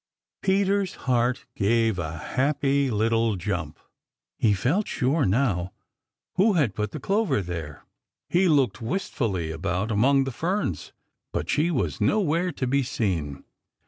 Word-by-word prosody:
Peter's 195 0 +1
heart 125 0 +1
gave 110 -1 +2
a 80 0 -4
happy 140 - +1
little 115 0 +1
jump. 90 -5 -3 0.6
He 105 -3 +3
felt 145 - 0
sure 140 +4 +1
now 95 -5 0 0.6
who 205 +3 +4
had 145 - +2
put 105 0 -2
the - - -7
clover 205 - +1
there. 85 -4 -6 0.4
He 180 +2 +3
looked 135 - +2
wistfully 110 - -2
about 90 +6 -2
among 135 +6 +4
the 135 - -3
ferns, 165 - -2 0.4
but - - -2
she 155 +3 +2
was 150 -7 -1
nowhere 180 -3 +2
to 140 - -3
be 140 +2 +2
seen. 85 - -2
125 Hz, 135 wpm, -25 LUFS, 95-150 Hz, 0.6 s, who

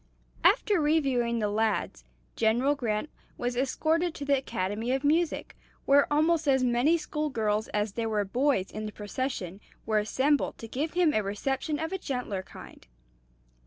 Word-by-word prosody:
After 410 -6 +4
reviewing 270 -6 +1
the 215 -2 0
lads, 210 - -1 0.3
General 240 +6 +2
Grant 235 -1 -2 0.3
was 245 0 -2
escorted 315 +6 0
to 285 - -5
the 280 0 +3
Academy 220 -2 -2
of 270 +1 -1
Music, 315 +3 +1 0.3
where 280 +1 +4
almost 310 +1 +2
as 265 -2 +3
many 250 +7 +3
school 305 -1 -3
girls 215 -4 0
as 210 0 -1
there 225 +2 -2
were 210 -2 0
boys 245 -2 +1
in 215 0 -5
the - - -6
procession 205 -3 -4 0.2
were 215 -1 +2
assembled 270 +7 +1
to 225 - -8
give 290 +8 -3
him 350 -4 +3
a 215 - +2
reception 265 +9 -2
of 320 +4 -3
a 380 - -2
gentler 250 - -3
kind. 190 - -13
255 Hz, 160 wpm, -28 LUFS, 215-295 Hz, 0.3 s, After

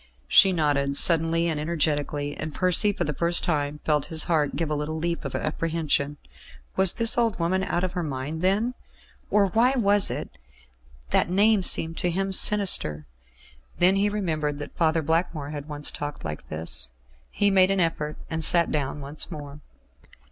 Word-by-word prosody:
She 195 - +6
nodded 145 -4 0
suddenly 165 0 +3
and 160 -3 -2
energetically, 145 -2 -2
and 155 -1 -7
Percy 185 +3 +4
for - - -3
the 150 - -3
first 170 +3 +1
time 150 -3 -2
felt 150 -2 0
his 160 -2 +1
heart 155 -4 0
give 160 -2 -3
a - - 0
little 150 +2 -4
leap 170 +1 -3
of 135 - -5
apprehension. 155 -2 -2 0.6
Was 190 -2 +5
this 230 0 +3
old 230 -3 0
woman 180 +3 -1
out 175 -1 -2
of 185 - -2
her 180 - -3
mind, 150 +1 -5
then? 205 +7 0 0.6
Or 205 -1 +3
why 230 +7 +2
was 205 -5 +4
it - - -5 0.8
that - - +2
that - - -12
name 205 +3 +3
seemed 165 -2 +2
to 180 - -1
him 195 +3 -2
sinister? 185 - +2 0.7
Then 185 +2 +4
he 200 +1 +1
remembered 155 -8 -2
that 145 - -9
Father 160 -1 +1
Blackmore 160 -2 -2
had 150 0 -8
once 145 -1 -4
talked 145 - -7
like 75 -1 -7
this. 75 -6 -2 0.4
He 205 -1 +1
made 190 -1 +4
an 195 0 0
effort, 155 -3 -2
and 160 -1 -4
sat 170 +1 +4
down 145 -1 -3
once 140 +2 -4
more. 145 -3 -9
165 Hz, 175 wpm, -24 LUFS, 150-185 Hz, 0.8 s, She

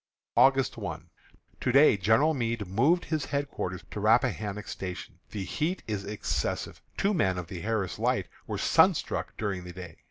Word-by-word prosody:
August 135 -1 +4
1. - - -6 0.5
To 125 - 0
day 140 -1 +7
General 110 - +3
Meade 115 -5 -1
moved 135 - +2
his 155 -2 -1
headquarters 140 -10 -3
to - - -4
Rappahannock 105 -1 +1
Station. 90 -2 -6
The 100 -3 -4
heat 155 - -2
is 105 -3 -3
excessive. 105 +1 -3 0.2
Two 200 +2 +2
men 95 - +1
of 90 - -4
the 90 0 -7
Harris 105 -3 -2
Light - - +1 0.2
were - - -3
sunstruck - - +2
during 100 -4 -2
the 90 0 -9
day. 90 -2 -9
105 Hz, 160 wpm, -28 LUFS, 95-135 Hz, 0.5 s, day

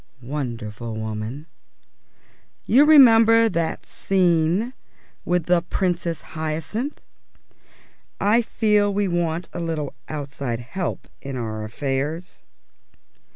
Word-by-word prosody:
Wonderful 120 -4 -5
woman! 110 +6 -5 1.2
You 275 +5 +6
remember 230 -6 +7
that 170 -4 -2
scene 180 +4 +1 0.5
with 180 -1 +1
the 175 -1 +3
Princess 175 -2 -2
Hyacinth? 160 - -3 1.2
"I 210 +4 +4
feel 210 -3 +2
we 200 0 0
want 175 -1 -1
a - - -4
little 160 -4 -3 0.2
outside 140 -5 -4
help 175 +8 -4
in 135 -2 -5
our 110 -2 -4
affairs." 140 +9 -3
165 Hz, 95 wpm, -23 LUFS, 135-200 Hz, 1.2 s, remember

